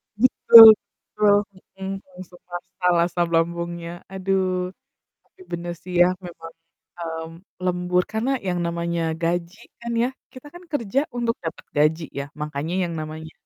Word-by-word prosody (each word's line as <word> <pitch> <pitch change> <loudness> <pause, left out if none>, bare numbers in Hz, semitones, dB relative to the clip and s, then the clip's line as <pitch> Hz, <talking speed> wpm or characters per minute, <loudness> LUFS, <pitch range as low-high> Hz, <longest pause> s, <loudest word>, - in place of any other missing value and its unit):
Betul 225 -1 +9
betul, 205 -1 0 0.4
mhm, 195 0 -5 0.2
langsung 180 -1 -12
masalah 175 -1 0
asam 175 -1 0
lambungnya, 170 0 -2 0.2
aduh. 185 -1 -1 0.5
Tapi 380 - -24
bener 175 0 -4
sih 180 0 -8
ya, 175 - +7 0.2
memang, 165 -2 -10 0.5
mmm, 160 -1 -5 0.3
lembur 180 0 +1
karena 220 +5 -1 0.2
yang 180 -1 -1
namanya 170 0 -2 0.2
gaji 170 +3 -2 0.2
kan 235 0 -6
ya, 250 - +1 0.2
kita 255 +3 -12
kan 350 +1 -12
kerja 270 -4 -1 0.2
untuk 235 -1 0
dapet 165 - -6
gaji 155 +2 +2 0.2
ya, 140 - -4 0.2
makanya 150 +3 -3
yang 170 -1 -3
namanya 155 +1 -7
175 Hz, 140 wpm, -23 LUFS, 170-195 Hz, 0.5 s, Betul